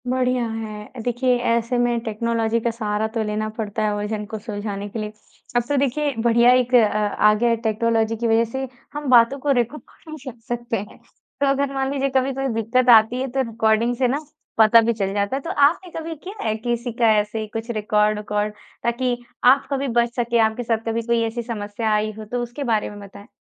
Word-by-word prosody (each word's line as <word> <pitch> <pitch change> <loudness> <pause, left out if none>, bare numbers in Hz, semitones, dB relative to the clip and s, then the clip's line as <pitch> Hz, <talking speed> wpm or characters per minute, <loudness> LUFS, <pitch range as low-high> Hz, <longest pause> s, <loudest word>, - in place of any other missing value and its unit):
बढ़िया 250 -1 +1
है, 215 -1 -6
अ, - - -8
देखिए 245 +1 +1
ऐसे 235 +1 +1
में 240 -1 +1
टेक्नोलॉजी 230 +1 0
का 235 - -1
सहारा 215 -1 -2
तो 225 - +1
लेना 215 0 -2
पड़ता 215 -1 -2
है 210 -1 +1
उलझन 210 +1 -3
को 220 +1 -6
सुलझाने 205 -2 -5
के 220 - -5
लिए, 210 0 -4 0.4
अब 240 - +3
तो 290 - +1
देखिए 280 +2 0
बढ़िया 235 +1 +5
एक 250 0 +1
अ, - - +9
आ 210 0 +2
गया 235 +3 +1
है 230 - +3
टेक्नोलॉजी 225 0 +1
की 230 +1 -2
वजह 225 0 +4
से 265 +1 -3 0.3
हम 295 -2 -4
बातों 245 +2 +5
को 285 +1 0
रिकॉर्ड 240 +6 -2 0.3
भी 300 -4 -7
रख 240 -2 -13
सकते 240 -1 -2
हैं। 205 +1 -8 0.4
तो - - +4
अगर 275 0 +1
मान 270 0 -1
लीजिए 275 -1 0
कभी 265 +1 +2
कोई 270 +1 -2
दिक्कत 235 +3 +1
आती 230 +2 +6
है 265 - -1
तो 265 +1 0
रिकॉर्डिंग 225 +2 +1
से 255 0 +2
ना, 270 +4 0 0.4
पता 225 +1 +7
भी 230 +1 +1
चल 195 -3 -2
जाता 200 +4 0
है, 275 - -3
तो 330 - -6
आपने 330 +6 +2
कभी 325 0 -5
किया 400 +3 -7
है 215 - +1
किसी 240 +2 -3
का 230 -1 +3
ऐसे 215 +1 -3
कुछ 225 +1 -5
रिकॉर्ड 210 -1 +1
विकॉर्ड 210 0 -2 0.3
ताकि 240 +1 0 0.4
आप 275 - -4
कभी 275 0 -1
बच 235 0 0
सकें 235 -1 +1
आपके 220 +2 +1
साथ 225 -1 -1
कभी 225 +1 0
कोई 235 0 +2
ऐसी 230 +2 -4
समस्या 220 -1 -3
आई 215 0 +1
हो 215 - -7
तो 245 0 -1
उसके 240 +4 -6
बारे 215 - 0
में 205 - -10
बताएँ? 200 +1 -12
230 Hz, 220 wpm, -22 LUFS, 215-255 Hz, 0.4 s, अ